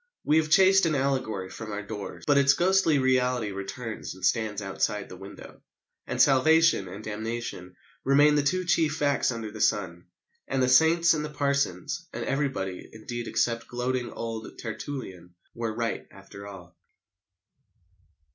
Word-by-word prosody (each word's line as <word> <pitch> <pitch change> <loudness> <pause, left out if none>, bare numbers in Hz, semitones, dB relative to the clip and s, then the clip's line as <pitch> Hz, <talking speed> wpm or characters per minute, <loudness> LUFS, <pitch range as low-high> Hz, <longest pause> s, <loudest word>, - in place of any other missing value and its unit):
We 150 - +3
have 155 -1 +1
chased 190 +2 +5
an 155 - 0
allegory 130 -9 -1
from 110 -2 -7
our 105 0 -4
doors, 105 0 -7
but 145 -1 +4
its 140 0 +5
ghostly 180 -3 +3
reality 125 -4 +1
returns 100 +2 -6
and 95 - -4
stands 110 -3 0
outside 100 +1 -2
the - - -9
window. 95 +2 -12 0.5
And - - -4
salvation 155 - +4
and 100 +4 -9
damnation 110 -4 -5 0.3
remain 145 +2 +5
the 145 - +3
two 180 +6 0
chief 165 -3 +2
facts 145 -4 +1
under 115 -2 -5
the 110 0 -7
sun. 90 -4 0 0.4
And 135 -1 0
the 130 - +2
saints 165 +5 +5
and 150 -1 -2
the 150 - -4
parsons 140 - -1
and - - -4
everybody, 135 -10 -2
indeed, 120 +2 -6
except 115 -1 0
gloating 125 0 -2
old 115 -1 -6
Tertullian 105 -7 -7 0.2
were 115 -1 -3
right 115 +1 -3
after 100 0 -12
all. 90 -4 -12
120 Hz, 155 wpm, -27 LUFS, 105-145 Hz, 0.5 s, chased